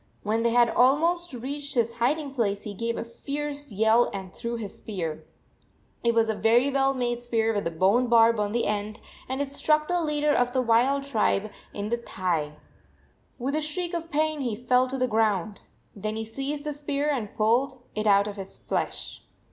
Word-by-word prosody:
When 220 +2 0
they 235 - +2
had 235 0 +4
almost 330 +9 +3
reached 280 +4 -5
his 235 -1 0
hiding 280 +3 0
place 205 -6 -1
he 210 - -6
gave 230 +3 -2
a - - -2
fierce 285 +3 -5
yell 220 +4 +3
and 190 -2 -7
threw 235 0 -4
his 215 -4 -7
spear. 170 -7 -5 0.8
It 235 -1 +2
was 225 -1 +4
a 220 - +1
very 240 +6 +3
well 270 0 +2
made 240 -1 -1
spear 225 -2 0
with 205 -4 -1
a - - 0
bone 195 +9 +2
barb 230 -1 +5
on 205 -1 0
the 235 +2 0
end, 210 +1 -2 0.3
and 265 +2 -1
it 275 - -7
struck 305 +2 +1
the 355 -1 +1
leader 300 -1 +1
of 245 -2 +1
the 260 - +2
wild 250 +4 +3
tribe 215 -5 0 0.2
in 205 +1 -4
the 235 - +1
94 235 - -10
thigh. 165 -7 0 0.8
With 270 +3 -2
a 310 - +1
shriek 340 +4 -3
of 335 -1 -4
pain 310 0 0
he 240 -5 -1
fell 250 +2 +2
to 265 +1 -3
the 255 -1 +1
ground. 215 -3 0 0.3
Then 215 +1 -3
he 220 0 -3
seized 275 +6 -4
the 300 0 -3
spear 290 0 -2
and 230 -8 -3
pulled 235 +5 +2 0.2
it 215 0 -1
out 200 0 +5
of 205 0 -6
his 195 -1 -8
flesh. - - -3
235 Hz, 205 wpm, -26 LUFS, 215-280 Hz, 0.8 s, barb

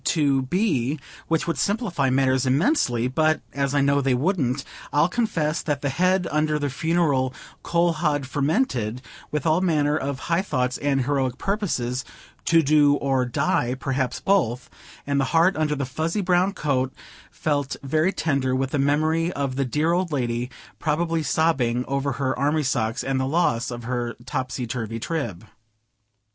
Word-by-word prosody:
to 140 -5 +2
B., 145 - 0 0.3
which 165 -1 +1
would 165 -5 -2
simplify 195 - 0
matters 130 0 +2
immensely; 130 - +2
but 155 +4 +2
as 140 +1 -1
I 145 - +4
know 140 +1 +3
they 135 -2 +2
wouldn't, 140 -3 0 0.3
I'll 150 +3 +4
confess 170 -7 0
that 145 -2 -2
the 140 - +1
head 185 +5 +2
under 155 0 +1
the 145 -2 -2
funereal 145 -4 +1 0.3
coal 170 0 +2
hod 145 -3 0
fermented 130 - -1 0.3
with 150 -2 -2
all 160 +2 +3
manner 150 -5 +2
of 140 -2 -3
high 170 +2 +1
thoughts 125 -9 -1
and 135 -3 +1
heroic 135 -3 0
purposes 135 - -1 0.4
"to 165 -1 +4
do 145 0 +5
or 135 -2 +1
die," 120 0 0
perhaps 130 -2 -1
both; 130 - +1 0.3
and 140 0 0
the 135 - +2
heart 175 +3 +4
under 155 -1 0
the 140 -1 -2
fuzzy 160 +9 -2
brown 185 +1 +2
coat 130 -6 0 0.4
felt 145 -3 -1
very 155 +6 +2
tender 140 -7 0
with 135 0 -1
the 145 - 0
memory 155 +4 +2
of 140 -5 -2
the 135 0 0
dear 150 +6 +1
old 175 0 0
lady, 120 -3 -1 0.3
probably 165 +1 0
sobbing 130 -5 +1
over 140 0 -1
her 130 -2 -1
army 150 +2 +1
socks 120 -2 -1
and 135 0 0
the 130 - 0
loss 140 -6 +1
of 120 -1 -6
her 120 -1 -3
topsy 130 -1 -3
turvy 115 -2 -4
Trib. 115 - -4
140 Hz, 165 wpm, -24 LUFS, 130-160 Hz, 0.4 s, do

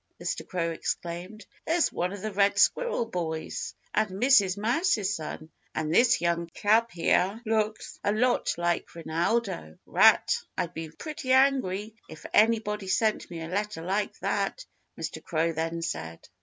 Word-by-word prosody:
Mr. - - -4
Crow 170 -3 -1
exclaimed. 175 +5 -5 0.2
"There's 330 0 +2
one 180 +1 -1
of 200 0 -7
the 215 - -2
Red 200 0 +2
Squirrel 475 - +2
boys 165 -7 -4 0.2
and 215 - +2
Mrs. 200 -2 +4
Mouse's 220 - +1
son. 155 -1 -7 0.2
And 155 0 -1
this 245 +5 +5
young 170 0 0
chap 225 +3 +3
here 185 +2 +1
looks 215 -1 -1
a 205 - +2
lot 245 +4 +1
like 175 0 -1
Rinaldo 170 - -1
Rat.... - - +5 0.2
I'd 175 0 -2
be 160 -1 -6
pretty 265 - -3
angry 240 -7 +2 0.2
if 160 - -11
anybody 210 -2 +2
sent 215 +3 +1
me 165 -2 -6
a - - -5
letter 205 0 -3
like 200 +4 -1
that," - - -1 0.3
Mr. - - -5
Crow 165 0 0
then 165 +1 -2
said. 80 - -5
200 Hz, 150 wpm, -27 LUFS, 170-220 Hz, 0.3 s, this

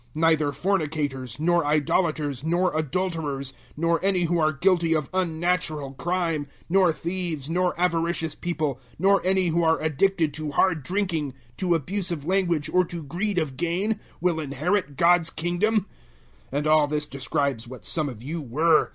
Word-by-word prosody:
Neither 155 -2 +3
fornicators, 145 - -2
nor 170 +2 +3
idolaters, 150 -2 0
nor 175 +2 +1
adulterers, 155 -3 -2 0.2
nor 165 +2 +1
any 190 -2 +2
who 170 0 +1
are 155 -1 +3
guilty 170 +1 +2
of 150 -3 -2
unnatural 165 -5 -1
crime, 165 -1 -1
006:010 140 - -26 0.2
nor 185 -1 +4
theives, 165 -3 -4
nor 180 0 0
avaricious 170 -2 0
people, 155 -6 -2 0.2
nor 195 +3 +4
any 185 -1 +2
who 170 +1 +1
are 160 0 +3
addicted 160 +1 +1
to 155 0 -4
hard 165 -3 +2
drinking, 165 -4 -2 0.2
to 175 -2 +2
abusive 170 -1 -3
language 175 -4 +1
or 185 0 +5
to 170 -1 -6
greed 180 +7 -2
of 155 -6 -1
gain, 185 +6 0 0.2
will 170 -2 +1
inherit 150 +3 -1
God's 170 -1 +4
Kingdom. 180 +6 0 0.7
006:011 140 - -1
And 150 - -1
all 155 -1 +5
this 150 0 -1
describes 140 -3 -2
what 130 +1 -10
some 155 -3 -1
of 120 -3 -9
you 160 +5 -4
were. 155 +5 +3
165 Hz, 160 wpm, -25 LUFS, 150-180 Hz, 0.7 s, or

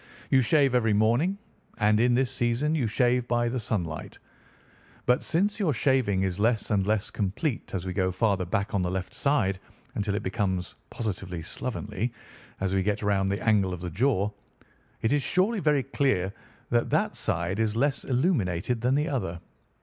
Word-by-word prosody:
You 130 - +6
shave 135 +2 +3
every 115 -3 +3
morning, 120 - +2 0.4
and 105 -1 +3
in 120 +1 +4
this 130 0 +1
season 125 +4 0
you 140 -7 +1
shave 125 +2 +2
by 120 -1 +1
the 125 +1 -2
sunlight; 85 -8 -3 0.9
but 125 0 +3
since 200 +6 0
your 175 -8 +2
shaving 120 -7 +2
is 95 0 -2
less 110 0 +1
and 100 -2 +2
less 105 -1 0
complete 110 - -2
as 95 -1 -3
we 95 - -3
get 95 0 +1
farther 100 -2 +2
back 100 +4 -1
on 100 - +1
the 90 - 0
left 95 0 -4
side, 110 -10 +1 0.3
until 100 -1 -1
it - - -2
becomes 95 -3 -1 0.2
positively 95 -6 -4
slovenly 110 -1 -3 0.5
as 95 -1 0
we 95 - +2
get 105 +2 -1
round 100 -1 +2
the 100 +3 -3
angle 100 -4 +3
of 85 - -11
the 90 -1 -4
jaw, 105 - +1 0.7
it 110 - +2
is 145 - +2
surely 190 - +1
very 150 -5 +2
clear 100 -11 0 0.4
that 120 0 +2
that - - +1
side 85 +5 -1
is 110 -1 +1
less 135 +4 +1
illuminated 120 - 0
than 125 +3 +2
the 150 +2 +1
other. 95 - -2
110 Hz, 180 wpm, -27 LUFS, 95-130 Hz, 0.9 s, You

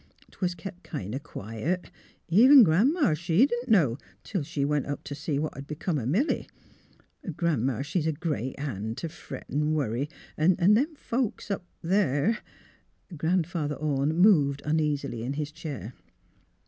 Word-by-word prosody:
'Twas 180 -2 -2
kep' 180 +1 -8
kin' 110 - -6
o' 135 - -2
quiet. 145 - -4 0.4
Even 250 - +8
Gran 195 - +4
'ma, 305 - +2
she 175 - +3
didn't 245 -1 -3
know, 145 - +4 0.2
till 195 -5 -2
she 140 0 -2
went 145 -1 0
up 145 - -4
t' - - -6
see 150 0 -2
what'd 140 -2 -4
be 150 - -5
come 155 -1 -1
o' 115 - -3
Milly. 215 - 0 0.9
Gran 165 -9 +1
'ma, 130 0 0
she's 160 +2 -1
a - - +2
great 150 -5 -3
han' 110 -6 -4
t' 165 - -4
fret - - -9
an' 150 +2 0
worry, 135 0 -1 0.3
'n' 170 +4 +4
them 215 - +3
folks 240 -6 -2
up 180 -3 -3 0.2
there 190 - +2 0.4
" 180 - -17
Grandfather 160 -2 0
Orne 145 +1 0
moved 155 -7 +4
uneasily 150 -6 0
in 125 +4 -2
his 150 0 -3
chair. 140 - -7
155 Hz, 160 wpm, -27 LUFS, 140-185 Hz, 0.9 s, Even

